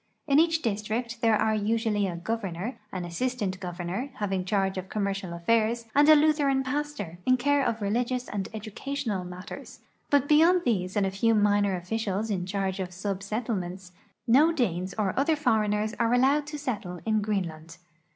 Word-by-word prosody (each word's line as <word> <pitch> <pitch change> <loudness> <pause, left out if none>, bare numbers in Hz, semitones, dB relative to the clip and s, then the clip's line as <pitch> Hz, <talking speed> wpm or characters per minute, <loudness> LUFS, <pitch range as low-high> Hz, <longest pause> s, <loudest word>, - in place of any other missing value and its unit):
In 280 0 +4
each 325 0 +2
district 230 +2 -2
there 225 -2 +4
are 220 +1 +1
usually 215 -1 0
a 175 - -4
gov 225 +6 -2
ernor, 190 +6 -4
an 180 -2 -4
assistant 200 +1 -2
governor, 180 +7 -4
having 195 -5 -2
charge 195 0 0
of 185 0 -8
commercial 200 -3 -2
all'aii's, 225 +7 +1
and 290 +2 +5
a 310 - +10
lAitheran 290 -3 +3
pastor, 265 - -4
in 255 0 +5
care 285 +2 +2
of 225 -4 -1
religious 245 +4 -1
and 195 -2 -4
educational 220 0 -4
mat 180 +1 -8
ters, - - -10 0.3
but 285 -1 +3
beyond 335 +4 +5
these 185 -5 0
and 200 - +3
a 190 - -1
few 225 +4 +2
minor 205 -2 +3
officials 210 +3 -2
in 180 -3 -2
charge 195 0 -2
of 185 -1 -3
sub 195 +1 -4
settlements, 195 -4 -4 0.3
no 285 +8 +5
Danes 185 - -1
or 200 -3 0
other 310 +3 +3
foreigners 215 -6 +1
are 230 +1 +3
allowed 280 +4 +3
to 300 0 -5
settle 205 -11 -4
in 215 -1 +2
Greenland. 170 -6 -3
215 Hz, 175 wpm, -27 LUFS, 190-255 Hz, 0.3 s, a